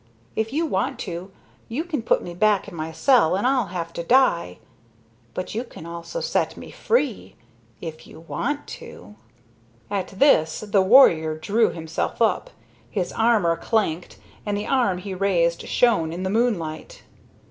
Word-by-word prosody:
If 220 +1 -1
you 315 +4 0
want 275 -3 -1
to, 180 0 -6 0.4
you 260 +8 -2
can 330 -7 -3
put 225 - +1
me 175 - -7
back 205 +3 +2
in 200 - -10
my 160 -1 -5
cell, 185 - +3
and 200 - -1
I'll 255 -4 +2
have 170 -2 -5
to 170 - -4
die. 170 - +3 0.8
But 185 - -4
you 230 +3 -2
can 230 -9 -12
also 170 - -6
set - - -1
me - - -10
free 295 - -1 0.5
if 160 -2 -8
you - - -13
want 290 - -3 0.2
to." 100 +3 -12 0.8
At 195 -2 -1
this 190 - +3
the 205 -2 +2
warrior 170 - +5
drew 220 +8 +2
himself 160 -1 -4
up. 235 - +1 0.4
His 185 -4 -3
armor 220 -7 +3
clanked, 180 -5 -1 0.3
and 205 -1 -2
the 205 - -3
arm 240 -9 +1
he 190 +1 -6
raised 175 -3 +1
shone 210 -10 +2
in 175 +3 -5
the 190 - -1
moonlight. 200 -9 -2
195 Hz, 160 wpm, -23 LUFS, 170-235 Hz, 0.8 s, warrior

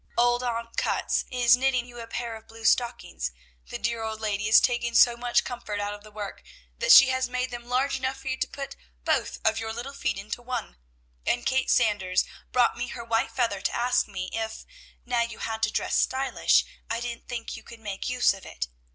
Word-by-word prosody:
Old 240 +1 +4
Aunt 230 -1 -3
Cutts - - 0
is 245 -2 +5
knitting 255 -1 +1
you 240 -1 -11
a 230 - -7
pair 235 0 -4
of 220 0 -13
blue 225 0 -11
stockings; 240 +1 +1 0.4
the - - -5
dear 235 0 -1
old 220 -1 -4
lady 210 -1 -1
is 220 - +8
taking 235 -1 0
so 240 0 +7
much 240 0 +1
comfort 235 -4 -5
out 205 0 -2
of 205 0 -10
the 215 - -12
work, 205 -2 -7 0.4
that - - +3
she 270 - +10
has 260 -1 0
made 250 +1 -2
them 240 0 -7
large 265 +2 +1
enough 260 0 -2
for 270 - -11
you 260 - -1
to - - 0
put 275 -1 -7 0.3
both - - 0
of 220 0 +3
your 225 0 -3
little 240 +5 -6
feet 275 - -1
into 210 +4 -5
one; 245 -2 -4 0.5
and 240 - 0
Kate 265 0 +1
Sanders 205 -6 +3 0.3
brought 250 -1 +3
me 245 +1 -3
her 235 0 -6
white 225 0 +1
feather 230 -4 0
to - - -1
ask 245 +1 +2
me 185 -2 -5
if, 220 0 -4 0.4
now 240 -1 +1
you 235 -1 -3
had 220 0 -4
to 215 -1 +2
dress - - -1
stylish, 265 0 +2 0.2
I 230 +1 -1
didn't 235 0 -6
think 240 -2 -5
you - - -9
could 235 - -12
make 205 -1 -4
use 250 -3 +3
of 195 - -11
it. - - -5
235 Hz, 220 wpm, -27 LUFS, 220-250 Hz, 0.5 s, she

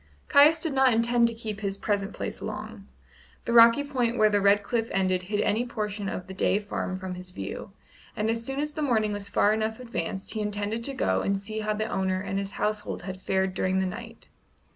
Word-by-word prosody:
Caius 300 +3 +7
did 315 -2 -3
not 265 -2 +4
intend 235 +1 +3
to 230 - -2
keep 220 -3 -5
his 200 -2 -3
present 200 -1 -1
place - - -5
long. - - -6 0.6
The 235 - -1
rocky 230 +4 +7
point 250 -4 -1
where 215 0 +4
the 205 -1 +2
red 200 +1 +4
cliff 225 +1 -1
ended 185 -1 +1
hid 210 0 +1
any 215 +3 +1
portion 210 -4 -3
of 180 - -5
the 190 - -9
Day 190 - +2
farm 205 -2 -3
from 185 0 -5
his 180 0 -8
view, 100 - -6 0.4
and 215 - -1
as 230 +1 -1
soon 270 +3 -3
as 300 +1 -1
the 310 - -4
morning 220 -7 +1
was 200 -1 -4
far 205 +1 +3
enough 220 +1 -2
advanced 195 -6 -4
he 215 - -2
intended 210 +2 -2
to 275 - -2
go 95 - +1
and 195 0 0
see 215 +2 -5
how 215 0 -1
the 215 +1 -1
owner 190 -3 -1
and 195 0 -2
his 200 0 -5
household 210 -3 -2
had 185 0 -7
fared 190 0 0
during 185 0 0
the 190 - +1
night. 230 +4 -7
210 Hz, 225 wpm, -27 LUFS, 195-230 Hz, 0.6 s, Caius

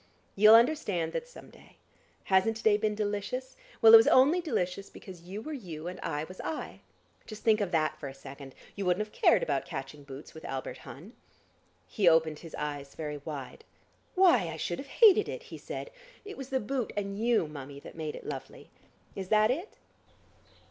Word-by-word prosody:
You'll 215 +2 +8
understand 225 - +2
that 485 - -3
some - - -14
day. - - -19 0.5
Hasn't 195 +4 +2
to - - -10
day 215 -1 +5
been 210 0 0
delicious? 210 +5 -3 0.3
Well, 225 0 +9
it - - +14
was 225 - +5
only 290 +8 +5
delicious 195 - -2
because 185 -3 -12
you 205 +3 -6
were 310 - -6
you 175 - -7
and 180 +1 -6
I 150 -2 -3
was 185 +4 -9
I. 320 - -5 0.5
Just 215 -1 -9
think 220 -1 +3
of 200 - 0
that 155 -2 0
for 140 - -6
a 135 - -11
second! 135 0 -11 0.2
You 200 -2 -3
wouldn't 180 +4 +1
have 210 - -22
cared 220 - +4
about 140 -3 0
catching 135 +2 -7
boots 140 +1 -11
with 160 - -11
Albert 130 -1 -5
Hun." 175 - -11 0.7
He 195 -6 +3
opened 160 -2 +2
his 165 -3 -10
eyes 145 -2 -5
very 150 -2 -5
wide. 140 -3 -8 0.5
"Why, 345 - +5
I 160 -1 -6
should 175 +2 -3
have 275 - -7
hated 425 - +5
it!" - - -6
he 470 - -10
said. - - -7 0.3
"It 410 - -8
was 270 -1 -8
the 265 -1 0
boot 250 +2 -3
and 200 -1 -2
you, 230 -5 +2
Mummie, 140 -1 -9
that - - -11
made 155 -2 -5
it - - -10
lovely. - - -8 0.4
Is 190 -2 -5
that 215 +2 +4
it?" 340 +11 -5
195 Hz, 195 wpm, -29 LUFS, 155-230 Hz, 0.7 s, it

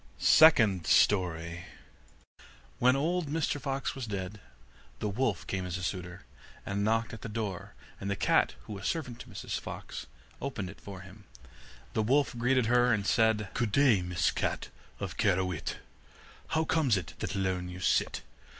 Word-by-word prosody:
SECOND 110 - +6
STORY 85 -3 +2 1.1
When 125 +1 +5
old 165 +4 0
Mr 145 -1 -1
Fox 135 -1 -2
was 130 -4 -5
dead, 100 0 -5 0.6
the 105 - -2
wolf 105 -2 -1
came 95 -1 -2
as 90 0 -3
a 90 - -6
suitor, 90 0 -4 0.4
and 100 +1 -1
knocked 115 +2 +1
at 110 - -8
the 115 - -6
door, 105 -4 -4 0.2
and 100 - -4
the 100 - 0
cat - - +2
who - - -8
was 100 -1 -4
servant 125 -8 -3
to - - -10
Mrs 100 -4 -4
Fox, - - -7 0.3
opened 110 -9 -4
it 100 - -17
for 95 -2 -8
him. 95 +2 -14 0.7
The 110 - +1
wolf 135 +4 +2
greeted 125 +1 +2
her, 120 +1 +4
and 105 -3 +1
said: 110 -3 +2
'Good 120 -3 -1
day, 125 -5 +4
Mrs 90 -2 0
Cat - - -2 0.3
of - - -5
Kehrewit, 90 -3 0 0.7
How 160 0 +1
comes 150 -9 +2
it 80 -4 -5
that 100 -2 -3
alone 95 -2 -1
you 90 0 -8
sit? 90 - +1
105 Hz, 165 wpm, -30 LUFS, 95-125 Hz, 1.1 s, SECOND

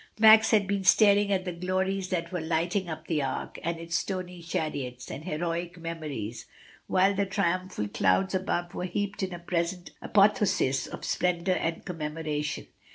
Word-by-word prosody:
Max 220 0 +8
had 210 -3 +4
been 195 0 -1
staring 205 +1 +5
at 190 -1 +1
the 180 - -2
glories 185 +2 -1
that 170 -2 -2
were 180 -2 -2
lighting 170 +3 0
up 160 0 -6
the 155 -3 0
Arc, 135 -1 -4
and 170 +1 -1
its 165 0 -4
stony 180 -1 -3
chariots, 140 -7 -4
and 150 - -7
heroic 170 +1 -3
memories, 150 -10 -5 0.4
while 190 +2 +3
the 200 0 0
triumphal 185 - -1
clouds 100 - +2
above 175 -2 -1
were 180 - -3
heaped 200 +3 -3
in 190 -1 -2
a 175 - -5
present 175 +1 -2
apotheosis 200 -9 +3
of - - -7
splendour 180 +1 +1
and 165 -2 -2
commemoration. 150 -3 -3
175 Hz, 160 wpm, -28 LUFS, 160-190 Hz, 0.4 s, Max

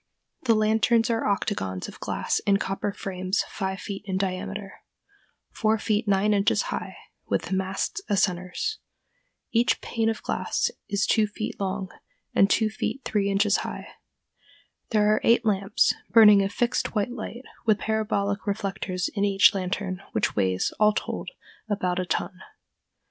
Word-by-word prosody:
The 230 -2 +5
lanterns 220 +2 +3
are 225 -1 0
octagons 185 - -1
of - - -11
glass - - -1
in 200 -1 +5
copper 195 +1 -2
frames 185 0 -2
five 190 -1 -3
feet 195 -1 -6
in 190 -1 -1
diameter, 195 +1 -4 0.7
four 220 0 +1
feet 215 0 0
nine 200 +1 +3
inches 200 0 +2
high, - - -5 0.3
with - - 0
the - - -4
masts 190 - -2
as 200 -2 +3
centers. 185 - -2 0.7
Each 235 +1 +2
pane 225 -1 -1
of 225 - -3
glass - - -1 0.2
is 200 -1 +1
two 215 -1 +3
feet 215 +3 -5
long 190 -1 -2 0.4
and 195 - +4
two 220 - +3
feet 270 +4 -3
three 200 -2 +1
inches 200 +1 +3
high. - - -6 1.0
There 210 -1 +3
are - - +1
eight 235 0 +4
lamps, 200 -1 +2 0.2
burning 210 -3 +8
a 195 - 0
fixed 240 +3 -1
white 210 +3 0
light, 240 +1 -7 0.2
with 215 -2 +5
parabolic 205 -2 -1
reflectors 195 -2 -2
in 200 - -2
each 200 -1 +5
lantern, 185 0 -3
which - - 0
weighs, 95 -2 +1
all 210 0 +5
told, - - -4 0.4
about 185 -3 0
a 180 - -2
ton. 180 +2 -2
200 Hz, 155 wpm, -26 LUFS, 190-215 Hz, 1.0 s, burning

